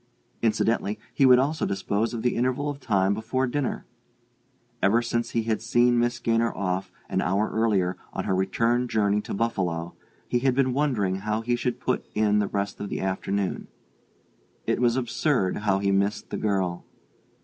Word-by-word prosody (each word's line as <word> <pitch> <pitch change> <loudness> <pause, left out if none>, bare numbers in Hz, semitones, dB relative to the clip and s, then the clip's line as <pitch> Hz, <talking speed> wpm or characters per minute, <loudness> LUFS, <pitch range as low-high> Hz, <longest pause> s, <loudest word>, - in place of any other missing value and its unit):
Incidentally, 110 -1 +1 0.2
he 135 - +4
would 125 -1 +8
also 145 +5 0
dispose 100 +3 -1
of 115 -2 -4
the 125 - +1
interval 130 +4 0
of 140 - -9
time 100 -6 +2
before 115 +5 -1
dinner: 135 +1 -2 1.0
ever 105 +4 +4
since 120 0 -1
he 115 - 0
had 110 -1 -1
seen 120 +1 +3
Miss 120 0 +1
Gaynor 115 -1 +1
off, 95 -1 -2 0.2
an - - 0
hour 100 +5 0
earlier, 100 -5 +1
on - - -3
her - - 0
return 115 +6 +1
journey 105 -2 +1
to - - -5
Buffalo, 90 -7 -1 0.3
he 120 - +1
had 130 0 +2
been 130 -1 +2
wondering 120 -10 +1
how 105 +2 -2
he 120 +1 0
should 120 0 -2
put - - -1
in 105 -1 +3
the 105 - +1
rest 100 0 -3
of 100 - -4
the - - -3
afternoon. 95 0 -2 1.0
It - - 0
was 120 -1 +3
absurd, 125 -5 0
how 100 -2 +1
he 100 0 +1
missed 100 +2 0
the - - -2
girl.... 95 -4 -1
110 Hz, 175 wpm, -26 LUFS, 100-120 Hz, 1.0 s, would